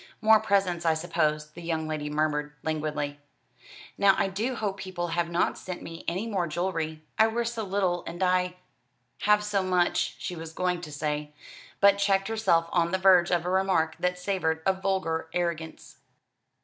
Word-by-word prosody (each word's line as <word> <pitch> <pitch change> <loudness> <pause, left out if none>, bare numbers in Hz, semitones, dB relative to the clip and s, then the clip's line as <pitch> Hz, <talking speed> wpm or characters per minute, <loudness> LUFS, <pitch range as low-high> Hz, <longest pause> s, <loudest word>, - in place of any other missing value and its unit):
"More 220 0 +6
presents, 185 -5 +1
I 165 -1 +3
suppose," 155 -2 -1
the 175 - -11
young 160 -2 -2
lady 155 -1 -3
murmured 150 -1 -1
languidly. 150 -2 -2 0.8
"Now 195 -1 +6
I 195 - +1
do 220 +7 -2
hope 205 -4 -2
people 185 -3 -4
have 170 0 0
not 170 +1 0
sent 185 -1 -7
me 165 0 -8
any 185 +6 -1
more 195 -6 -1
jewellery. 160 -2 -3 0.2
I 220 - +7
wear 235 +1 -1
so 230 -1 -3
little, 185 -3 0
and 175 +3 -3
I 180 0 +2 0.3
" 125 +1 -46
Have 210 0 +5
so 205 -1 0
much, 180 -2 +1
she 180 - -5
was 160 -1 -8
going 180 0 -1
to 155 -3 -8
say, 150 0 -3 0.4
but 200 0 +5
checked 195 0 +2
herself 195 -7 +2
on 170 -1 +2
the 190 - 0
verge 185 -2 +5
of 175 -2 +1
a 180 - -1
remark 185 -4 +2
that 180 0 0
savoured 180 -4 -1
of 190 0 +1
vulgar 185 -5 -1
arrogance. 170 -2 -3
175 Hz, 180 wpm, -27 LUFS, 160-195 Hz, 0.8 s, I